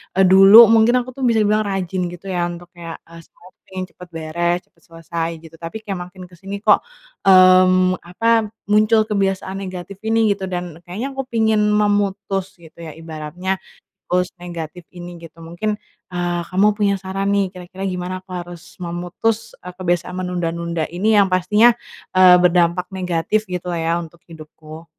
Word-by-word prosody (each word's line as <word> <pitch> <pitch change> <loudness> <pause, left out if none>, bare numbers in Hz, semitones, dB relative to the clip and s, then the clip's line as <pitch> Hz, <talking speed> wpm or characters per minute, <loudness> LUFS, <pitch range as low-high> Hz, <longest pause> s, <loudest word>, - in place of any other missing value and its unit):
eee, 195 - +4
dulu 195 +4 +9
mungkin 225 +2 +5
aku 255 - -10
tuh 265 +1 -8
bisa 225 -2 +3
dibilang 210 +1 +1
rajin 185 -2 -2
gitu 175 +2 -9
ya, 175 -1 0
untuk 175 0 -9
kayak, 170 -2 -9
eee, 170 0 -14
siapin, 185 +2 -12
cepet 180 - -13
beres, 170 +2 -1
cepet - - -35
selesai, 165 0 -4
gitu. 165 0 -14
Tapi 170 +7 -7
kayak 195 -4 -4
makin 185 0 -13
ke 180 -1 -15
sini 200 +2 -7
kok, 210 -2 +5 0.5
mmm, 185 -1 +6
apa, 225 +5 +1 0.2
muncul 215 +1 +4
kebiasaan 195 -2 -2
negatif 185 0 -7
ini, 225 -1 +3
gitu. 195 -1 -3
Dan 175 -3 -5
kayaknya 220 +10 -4
aku 270 -1 -5
pingin 220 -3 +1
memutus, 205 -2 0
gitu 160 +1 -17
ya, 160 -3 -9
ibaratnya, 165 +4 -5 0.5
pulse 180 0 0
negatif 175 -1 -8
ini, 175 0 -9
gitu. 165 0 -14
Mungkin, 175 +6 -3 0.4
eee, 175 -1 -2
kamu 190 +3 +2
punya 200 -2 +2
saran 195 +1 -3
nih, 200 -2 +1
kira-kira 185 +1 -9
gimana 180 0 -4
aku 190 - -40
harus 175 -1 -9
memutus 175 +6 -3
e - - -10
kebiasaan 180 -1 -2
menunda-nunda 170 -2 -3
ini, 215 +4 +2
yang 200 - +4
pastinya, 210 +6 +4 0.4
eee, 185 -1 +8
berdampak 175 0 +2
negatif 180 +3 -1
gitu 180 0 -4
lah 170 - -2
ya, 165 +1 +1
untuk 170 0 -10
hidupku. 155 0 -12
185 Hz, 165 wpm, -19 LUFS, 175-200 Hz, 0.5 s, dulu